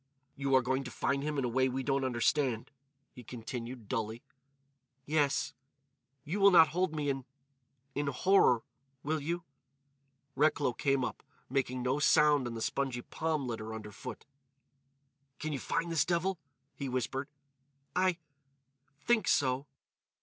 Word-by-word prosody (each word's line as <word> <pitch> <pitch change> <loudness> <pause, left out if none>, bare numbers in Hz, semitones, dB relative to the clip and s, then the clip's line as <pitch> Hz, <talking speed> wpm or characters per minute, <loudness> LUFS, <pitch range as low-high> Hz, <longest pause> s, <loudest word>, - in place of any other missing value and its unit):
"You 135 -1 +1
are 130 - +5
going 130 +2 0
to - - -5
find 140 +2 -1
him 150 0 -2
in 135 - +1
a - - +1
way 130 +2 +2
we 130 +1 -2
don't 135 0 +1
understand," 125 -1 +1 0.4
he 125 - -11
continued, 120 0 -7
dully. 110 +2 -3 0.8
"Yes.... 145 -2 +1 0.7
You 165 +7 -3
will 200 0 +8
not 165 -4 +7
hold 175 0 0
me 150 -1 -1
in—in 135 +1 -8
horror—will 135 -2 +1
you?" 170 +4 -3 0.9
Recklow 145 -2 +2
came 135 +1 +1
up, 115 - -5 0.3
making 130 -2 0
no 130 +3 +1
sound 150 -3 +5
on 115 - -5
the 115 - -3
spongy 130 -3 -1
palm 155 -3 -2
litter 110 -2 -4
underfoot. 105 -1 -8 1.1
"Can 155 -1 -3
you 140 - -2
find 170 +5 -1
this 160 -5 +3
devil?" 175 +3 0 0.3
he 140 -2 -5
whispered. 130 +2 -2 0.7
"I—think 145 - -2
so." 130 0 +2
135 Hz, 135 wpm, -32 LUFS, 125-150 Hz, 1.1 s, will